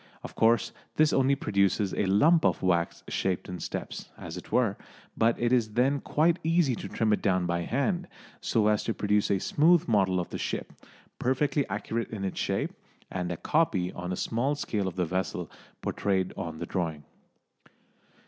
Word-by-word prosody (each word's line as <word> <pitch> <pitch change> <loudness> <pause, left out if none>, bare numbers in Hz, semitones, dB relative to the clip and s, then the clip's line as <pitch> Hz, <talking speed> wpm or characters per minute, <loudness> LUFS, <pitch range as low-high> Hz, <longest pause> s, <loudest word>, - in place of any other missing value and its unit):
Of - - -8
course 115 +1 +3 0.2
this 155 0 +4
only 135 +1 +3
produces 100 -5 +1
a 100 - 0
lump 155 - +5
of - - +1
wax 85 -2 +1
shaped 95 -2 -1
in 90 -1 -6
steps, - - -5
as 85 0 -7
it 90 - -9
were, 115 -6 +2 0.4
but 115 +1 +2
it 120 +1 +2
is 110 -4 +2
then 135 +4 +2
quite 165 +5 +2
easy 165 -4 +3
to - - -6
trim 110 -2 +1
it - - 0
down 95 -2 +2
by 85 0 0
hand, 175 - -1 0.3
so 110 -3 +1
as 105 -1 +2
to 115 - -1
produce 105 0 +1
a 100 - +3
smooth 165 - +3
model 95 -5 +3
of 90 - -3
the - - -5
ship, - - -3 0.5
perfectly 135 +1 +1
accurate 110 +3 -3
in 105 -3 -5
its 95 - -3
shape, - - -1 0.4
and 90 -1 -2
a 85 - -3
copy 100 - +1
on 90 +1 -5
a - - -1
small 125 +9 0
scale 105 -8 -2
of 95 - -4
the 90 -1 0
vessel 95 +3 -3 0.3
portrayed 95 -2 0
on 85 -4 -5
the 85 - -4
drawing. 80 -5 -3
105 Hz, 185 wpm, -28 LUFS, 95-130 Hz, 0.5 s, lump